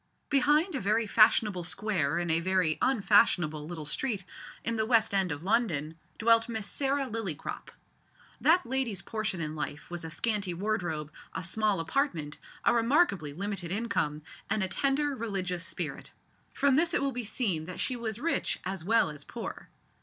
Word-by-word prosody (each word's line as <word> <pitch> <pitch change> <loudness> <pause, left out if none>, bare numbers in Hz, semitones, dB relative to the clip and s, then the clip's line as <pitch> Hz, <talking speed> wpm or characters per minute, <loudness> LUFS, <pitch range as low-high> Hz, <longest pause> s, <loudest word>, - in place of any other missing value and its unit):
Behind 295 +6 +3
a 275 - -1
very 215 +4 +1
fashionable 210 -3 +4
square 170 -5 0
in 175 -1 0
a 165 - +4
very 180 -3 +1
unfashionable 195 - +3
little 160 -3 -6
street, 205 - -2 0.4
in 230 - +1
the 220 -1 0
west 225 -3 +3
end 190 -3 +1
of 145 +2 -5
London, 185 -8 +1 0.2
dwelt 230 +1 +4
Miss 220 -3 -3
Sarah 275 +5 +1
Lillycrop. 220 - -4 0.7
That 335 -1 +4
lady's 240 -6 -2
portion 215 -4 -3
in 155 -1 -2
this 155 - -8
life 150 +2 -5
was 175 -1 -5
a 160 - -5
scanty 200 +2 -1
wardrobe, 175 -6 -2 0.2
a - - -3
small 205 +2 +1
apartment, 165 - -1 0.3
a - - +5
remarkably 230 - +2
limited 190 +2 -4
income, 165 -8 -1 0.3
and 210 -1 +1
a - - 0
tender, 275 +8 +1
religious 190 -7 -2
spirit. - - -5 0.4
From 280 -1 +2
this 330 +5 +3
it - - +2
will 275 - +1
be 245 -1 -3
seen 200 -8 0
that 180 +1 -7
she 255 - +1
was 225 -3 -3
rich 330 +7 -1
as 190 -3 -3
well 210 -4 +3
as 145 -1 -8
poor. - - -7
205 Hz, 170 wpm, -29 LUFS, 170-235 Hz, 0.7 s, a